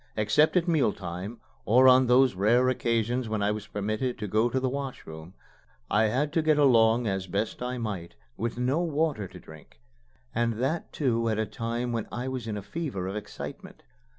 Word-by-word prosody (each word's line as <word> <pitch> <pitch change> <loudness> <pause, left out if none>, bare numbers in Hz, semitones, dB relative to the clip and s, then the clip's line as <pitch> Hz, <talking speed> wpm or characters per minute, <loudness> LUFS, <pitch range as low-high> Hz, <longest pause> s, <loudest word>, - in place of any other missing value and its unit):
Except 110 - +3
at 175 0 +1
meal 155 -10 +2
time, 95 +5 -7 0.2
or 125 +4 +5
on 130 0 +6
those 125 0 +5
rare 115 +7 +3
occasions 120 -1 0
when 110 -2 -1
I 105 - +2
was 105 0 -5
permitted 110 +5 -2
to 105 - -4
go 110 +4 +2
to 130 - 0
the 130 - 0
wash 135 0 -5
room, 80 +3 -10 0.6
I 105 +1 +4
had 135 +7 0
to 165 - +2
get 155 -1 +3
along 120 -4 +4
as 95 -2 -2
best 100 +6 -2
I 125 +1 -3
might 100 -8 -5 0.2
with 115 +2 -3
no 130 +5 +1
water 155 - -1
to - - -12
drink, 75 -5 -15 0.5
and 115 0 +1
that 135 +9 -2
too 115 -5 0
at 110 - 0
a 110 - 0
time 115 +2 -3
when 115 -2 -2
I 120 +3 -4
was 130 -3 -4
in 105 -2 -3
a 100 - -6
fever 135 - -4
of 95 +2 -4
excitement. 105 - -8
115 Hz, 200 wpm, -27 LUFS, 105-130 Hz, 0.6 s, on